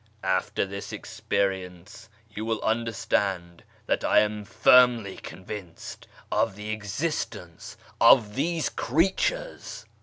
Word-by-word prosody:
After 95 +1 0
this 100 +1 -7
experience 95 +2 -4 0.2
you 105 0 -7
will 110 -1 -1
understand 100 -6 -1 0.2
that - - 0
I - - +5
am 105 0 -2
firmly 120 -3 +4
convinced 95 -2 -9 0.2
of 95 - +1
the 105 +1 -6
exist 110 - -3
ence 85 -2 -11 0.2
of 110 -5 +6
these 160 +5 -1
creatures." 190 - -1
105 Hz, 110 wpm, -26 LUFS, 95-120 Hz, 0.2 s, of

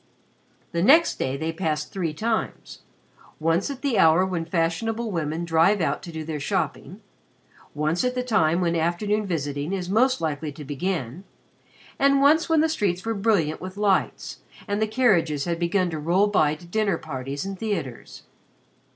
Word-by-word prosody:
The 170 - -1
next 310 - +5
day 130 +1 -1
they 160 +3 -2
passed 160 -3 -2
three 175 -5 -2
times 220 +8 -3 0.6
once 165 - +1
at 275 -1 -7
the 255 -8 +1
hour 165 +2 +5
when 175 -3 -3
fashionable 210 +8 -1
women 165 -1 -2
drive 170 +5 +3
out 145 -4 -1
to 170 - -9
do 160 -1 -5
their 155 -1 -4
shopping, 140 - -3 0.7
once 155 +6 0
at 250 0 0
the 250 - -1
time 185 -8 +2
when 170 -1 +1
afternoon 200 +6 0
visiting 145 -1 -3
is 185 -1 -3
most 255 +5 +3
likely 155 -1 -3
to 150 +1 -10
begin, 150 0 -3 0.8
and 275 0 +4
once 310 +5 +4
when 320 -1 +4
the 320 - +3
streets 200 - -1
were 225 - 0
brilliant 195 -8 +1
with 185 +1 -7
lights 200 -2 0 0.3
and 205 +1 -1
the 220 - +2
carriages 175 - +2
had 170 -1 -2
begun 175 +1 +1
to 160 - -4
roll 175 +6 +2
by 155 -8 +2
to 165 +3 -14
dinner 200 0 0
parties 140 0 -5
and 195 -1 -6
theaters. 165 - -5
175 Hz, 170 wpm, -24 LUFS, 160-210 Hz, 0.8 s, next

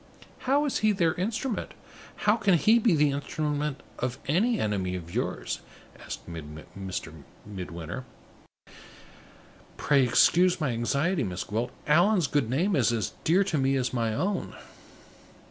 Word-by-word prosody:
"How 285 +2 +4
is 285 - 0
he 215 -1 +3
their 170 -4 +2
instrument? 220 +5 -3 0.5
How 210 - +5
can 205 -5 +3
he 215 +9 +5
be 215 -6 +3
the 150 -1 +3
instrument 145 0 -2 0.2
of 125 +1 -2
any 215 - +2
enemy 95 -4 -1
of 85 -1 -8
yours?" - - -2 0.4
asked - - -7
Midwinter. 85 +1 -8 1.7
"Pray 140 -2 +3
excuse 175 +9 +4
my 150 -5 0
anxiety, 140 +8 0
Miss 90 -3 -3
Gwilt: 115 +4 -2 0.2
Allan's 175 +4 +4
good 140 -5 0
name 175 +10 +1
is 120 -6 +3
as 110 -4 -2
dear 180 +5 +4
to 175 -7 -1
me 135 0 +2
as 130 -1 -1
my 115 -2 0
own!" 190 +6 -2
145 Hz, 135 wpm, -27 LUFS, 110-185 Hz, 1.7 s, How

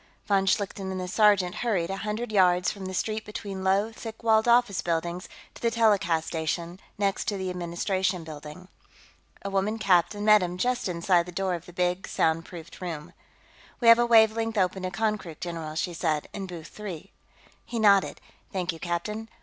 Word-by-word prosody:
Von 195 -1 +2
Schlichten 195 0 0
and 190 0 -3
the 180 - -4
sergeant 195 -2 +3
hurried 195 -8 -1
a 195 - -3
hundred 215 +3 -3
yards 180 -3 +3
down 195 -2 -8
the 190 - -5
street 215 +3 -2
between 200 -2 -6
low, 195 +3 +2
thick 225 0 -9
walled 220 0 +3
office 235 -5 +4
buildings 170 +1 -2 0.2
to - - -14
the 235 - +2
telecast 200 -8 +2
station, 170 +2 -3 0.2
next 200 -1 0
to 205 - -1
the 190 -1 -3
Administration 180 +1 -1
Building. 155 +3 -10 0.8
A 200 - -4
woman 195 +3 0
captain 205 0 +2
met 215 -1 +7
him 180 0 -3
just 245 0 0
inside 175 0 +2
the - - -7
door 190 +1 -1
of 170 0 -6
the - - -10
big 180 +1 -1
soundproofed 165 +2 -2
room. 170 -1 -6 0.7
"We 235 - +1
have 230 +1 +9
a 240 - +3
wavelength 225 -1 +4
open 190 0 +1
to 185 - -2
Konkrook, 195 -4 -2
general," 165 -3 -5
she 175 +2 -2
said. 160 -3 -1
"In 195 -2 -5
booth 170 -3 -9
three." 195 -4 -8 0.5
He 235 - -6
nodded. 200 -3 +4 0.3
"Thank 180 -2 -2
you, 165 - -11
captain.... 210 +6 -3
190 Hz, 180 wpm, -27 LUFS, 175-210 Hz, 0.8 s, have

